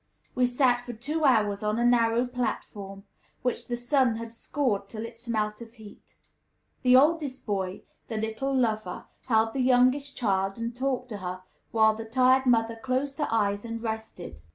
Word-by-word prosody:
We 250 0 +2
sat 245 -1 +2
for 245 - -7
two 295 +8 -2
hours 210 -6 +3
on 210 +1 0
a 240 - +1
narrow 235 0 +3
platform, 205 -5 -4 0.4
which 250 -1 -2
the 240 - -2
sun 245 -1 +2
had 230 0 -6
scorched 230 -5 -2
till 220 0 -5
it 230 0 -9
smelt 215 -2 -2
of 230 -1 -10
heat. 220 -4 -14 0.7
The 250 -1 +5
oldest 290 -1 +3
boy 190 -3 -3 0.2
the 225 - -4
little 220 +5 -2
lover 225 -5 -1 0.2
held 225 -2 +2
the 270 - -1
youngest 255 +3 +3
child, 195 -4 0
and 230 +1 -4
talked 255 -1 -2
to 210 - -5
her, 185 -1 -6 0.3
while 220 -1 +4
the 225 +1 -7
tired 255 +3 +3
mother 230 -1 +2
closed 265 +4 -2
her 295 - +1
eyes 205 -2 +1
and 230 0 -5
rested. 220 - -6
230 Hz, 175 wpm, -27 LUFS, 215-255 Hz, 0.7 s, The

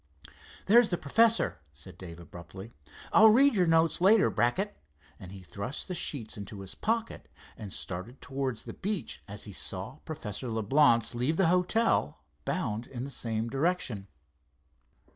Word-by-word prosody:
"There's 235 +2 +6
the 175 - 0
professor," 225 - +3 0.2
said 80 +5 -10
Dave 85 -2 -9
abruptly, 90 +5 -11 0.4
"I'll 220 +1 +8
read 270 +5 +5
your 185 -5 +2
notes 165 +1 +3
later, 200 +3 +5
Brackett," 190 +13 0 0.4
and 90 - -10
he 95 -1 -10
thrust 100 - -5
the 185 - -4
sheets 130 -11 -3
into 100 0 -8
his 95 - -6
pocket, 225 +1 -2 0.3
and 105 -4 -9
started 95 +10 -5
towards 135 -4 -3
the - - -8
beach 195 - -4
as 100 0 -5
he 100 - -8
saw 100 +9 -3
Professor 125 -6 -6
Leblance 115 +2 +3
leave 125 +7 -1
the 190 -4 +3
hotel, 180 +6 +1 0.2
bound 120 -10 -2
in 125 -2 -6
the 140 - -6
same 115 -2 -2
direction. 135 - -1
130 Hz, 150 wpm, -29 LUFS, -, 0.4 s, I'll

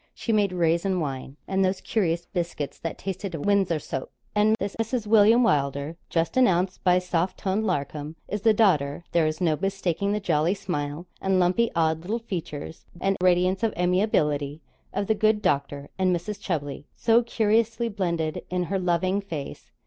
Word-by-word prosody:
She 230 - -2
made 205 -3 +3
raisin 175 +2 +1
wine, 135 -2 -4
and 195 0 +1
those 185 0 +1
curious 175 -6 0
biscuits 170 -5 -4
that 165 - -4
tasted 195 -1 -4
of 145 - -5
Windsor 200 -5 +2
soap. 135 -3 -5 0.2
And 215 +1 +4
this 200 0 -3
Mrs. 225 0 -1
William 220 +3 +6
Wylder 140 - 0
just 165 -1 0
announced 185 -7 +2
by 180 -1 +5
soft 180 0 -1
toned 200 +3 -1
Larcom, 145 +2 -3
is 210 - -3
the 225 - +5
daughter 170 -9 +2
(there 165 -2 +3
is 155 +1 -3
no 165 -4 +2
mistaking 195 -1 -1
the 210 - 0
jolly 170 -1 +1
smile 155 -4 -4 0.2
and 190 -1 +2
lumpy 185 +6 +3
odd 160 -1 +1
little 205 +7 -2
features, 170 -8 -6
and 195 +1 +1
radiance 185 +1 +3
of 225 -2 0
amiability) 155 -6 +1 0.3
of 200 - -1
the 220 - +2
good 215 0 +2
doctor 140 -6 -1
and 185 -1 +3
Mrs. 195 +4 -5
Chubley, 145 -5 -3
so 230 0 +4
curiously 230 0 +1
blended 170 -7 -2
in 180 0 0
her 195 - +1
loving 185 +2 +1
face. 160 -8 -7
180 Hz, 170 wpm, -25 LUFS, 160-205 Hz, 0.3 s, William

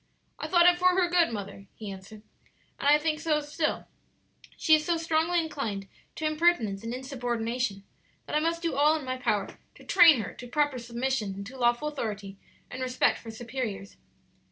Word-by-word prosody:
"I - - -4
thought 345 -2 +5
it 355 0 +5
for 365 0 +4
her 360 - +3
good, 345 -5 +3
mother," 200 -2 -7
he 210 -3 -7
answered; 195 +3 -11 0.6
"and - - -1
I 295 - +7
think 305 0 -1
so 310 -1 +1
still; 300 +1 -2 0.7
she 315 - +3
is 310 -1 +5
so 340 +1 0
strongly 330 +1 +1
inclined 230 -12 -4 0.3
to 315 - -4
impertinence 310 - +1
and 230 - -4
insubordination 245 -4 -3 0.4
that - - -4
I - - +4
must 335 +2 -1
do 335 -3 0
all 295 +3 +4
in 300 - -8
my 255 0 -3
power 215 -6 -2 0.2
to - - -16
train 310 -8 +6
her 200 - -6
to 245 - -10
proper 290 0 0
submission 235 -4 -3
to 235 +7 -10
lawful 240 +3 +1
authority 205 -8 -5 0.3
and 255 - -6
respect 255 0 +1
for 230 - -10
superiors." 225 -3 -5
260 Hz, 180 wpm, -28 LUFS, 225-315 Hz, 0.7 s, I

